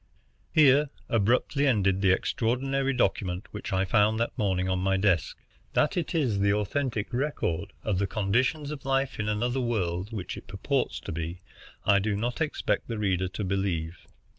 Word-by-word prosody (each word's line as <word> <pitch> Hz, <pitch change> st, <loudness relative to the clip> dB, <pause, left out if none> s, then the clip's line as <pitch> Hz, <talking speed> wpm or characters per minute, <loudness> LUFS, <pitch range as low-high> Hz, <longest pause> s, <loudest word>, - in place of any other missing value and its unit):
Here 145 Hz, -1 st, +5 dB, 0.2 s
abruptly 120 Hz, +6 st, +2 dB
ended 100 Hz, -6 st, +2 dB
the 95 Hz, -, +4 dB
extraordinary 135 Hz, +7 st, 0 dB
document 95 Hz, -6 st, 0 dB
which 105 Hz, -, -6 dB
I 95 Hz, 0 st, +1 dB
found 105 Hz, +2 st, +3 dB
that 115 Hz, -, -1 dB
morning 95 Hz, -3 st, 0 dB
on 95 Hz, 0 st, 0 dB
my 95 Hz, +1 st, +1 dB
desk. 95 Hz, -5 st, +1 dB, 0.4 s
That 175 Hz, -, +2 dB
it 175 Hz, -1 st, -2 dB
is 125 Hz, -11 st, +1 dB
the 100 Hz, 0 st, +3 dB
authentic 110 Hz, +2 st, -2 dB
record 125 Hz, -, -1 dB
of 100 Hz, -4 st, 0 dB
the 100 Hz, -, +1 dB
conditions 130 Hz, +10 st, 0 dB
of 150 Hz, -3 st, -7 dB
life 135 Hz, -1 st, 0 dB
in 105 Hz, 0 st, -1 dB
another 120 Hz, +5 st, 0 dB
world 100 Hz, -4 st, -1 dB
which 105 Hz, -5 st, -5 dB
it -, -, -11 dB
purports 115 Hz, +8 st, -1 dB
to -, -, -6 dB
be 85 Hz, +3 st, -5 dB, 0.4 s
I 100 Hz, 0 st, +5 dB
do 105 Hz, +1 st, -1 dB
not 120 Hz, +8 st, -2 dB
expect 155 Hz, -, -1 dB
the 115 Hz, -, -3 dB
reader 95 Hz, -3 st, 0 dB
to 100 Hz, +3 st, -5 dB
believe. 90 Hz, -4 st, -2 dB
105 Hz, 170 wpm, -28 LUFS, 95-130 Hz, 0.4 s, Here